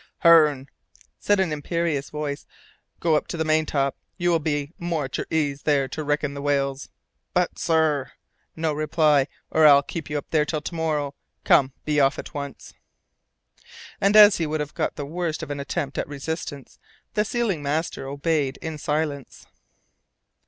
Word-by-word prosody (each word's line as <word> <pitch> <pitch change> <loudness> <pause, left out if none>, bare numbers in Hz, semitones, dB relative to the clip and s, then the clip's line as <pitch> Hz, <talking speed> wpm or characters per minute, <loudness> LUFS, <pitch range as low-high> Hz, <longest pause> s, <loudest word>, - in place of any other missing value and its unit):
"Hearne," 150 -5 +6 0.5
said 205 -1 +2
an 180 -5 +1
imperious 150 -1 -2
voice, 150 -1 -5 0.5
"go 165 -2 +2
up 150 - 0
to 170 - -5
the 160 - -1
maintop. 155 -3 +1 0.2
You 175 -1 +1
will 165 - +3
be 145 -1 -2
more 170 -4 -2
at 130 - -6
your - - -4
ease 145 -3 0
there 140 -3 +2
to 155 - -4
reckon 145 -1 -1
the 140 - -6
whales." 140 -1 -1 0.5
"But, 180 -1 +1
sir 155 -5 +1 0.2
" - - -45
"No 160 -1 -1
reply, 150 -2 +2 0.2
or 155 -1 +6
I'll 140 -1 +7
keep 165 +3 -6
you 150 - -1
up 145 - -6
there 155 - +3
until 150 +1 -2
to 160 - -6
morrow. 155 -4 -1 0.3
Come 130 -1 +4
be 150 -1 +1
off 135 -1 +3
at - - -8
once." 140 -3 -7 1.3
And 200 +2 +3
as 210 -1 +9
he 165 - -1
would 155 +1 -2
have 150 0 -4
got - - -2
the 145 - -5
worst 165 +1 -3
of - - -6
an 145 - -4
attempt 140 0 -3
at - - -2
resistance, 145 -1 -6 0.3
the 210 - +2
sealing 220 - -1
master 145 -1 -2
obeyed 140 -1 -1
in 160 -2 -6
silence. 150 -2 -3
150 Hz, 175 wpm, -24 LUFS, 140-160 Hz, 1.3 s, as